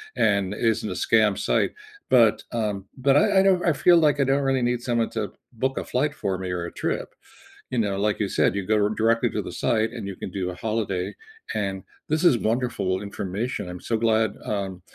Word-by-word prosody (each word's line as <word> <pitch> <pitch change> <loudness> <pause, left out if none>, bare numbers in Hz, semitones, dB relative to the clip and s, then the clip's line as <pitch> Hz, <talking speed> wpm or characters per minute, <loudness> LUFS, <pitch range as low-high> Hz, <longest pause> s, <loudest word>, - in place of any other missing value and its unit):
and 100 -1 +2
isn't 110 0 0
a - - -3
scam 110 -3 +2
site, - - +1 0.4
but, 115 -4 +4
um, 105 -4 -2 0.2
but 135 -1 +5
I 200 +4 +4
I - - +5
don't 190 -2 +3
I 170 - +4
feel 175 +4 +5
like 150 -3 +3
I 140 - +4
don't 135 +2 +2
really 135 -1 +2
need 120 -1 -1
someone 120 -2 0
to 105 -3 -2 0.2
book 130 +3 -2
a - - -3
flight 145 +4 0
for 95 -7 -2
me 95 -1 -5
or 90 -1 -2
a 85 - -6
trip, - - -3 0.6
you 125 - -1
know, 100 -3 0
like 105 +1 0
you 105 - 0
said, - - +2
you 100 -2 -2
go 110 - +3
r 105 - +2
directly 115 +2 +2
to - - -2
the - - -7
site 110 -1 +2
and 115 -4 -5
you 95 - -6
can - - -6
do 90 -1 -3
a 90 - -6
holiday, 105 -5 -2 0.4
and 95 -2 -2 0.3
this 155 +3 +1
is 130 -9 +6
wonderful 110 -5 -1
information, 100 +1 -4
I'm 90 0 -7
so 115 - +2
glad, 110 -2 +2
um, 95 -3 -3
110 Hz, 220 wpm, -24 LUFS, 100-125 Hz, 0.6 s, is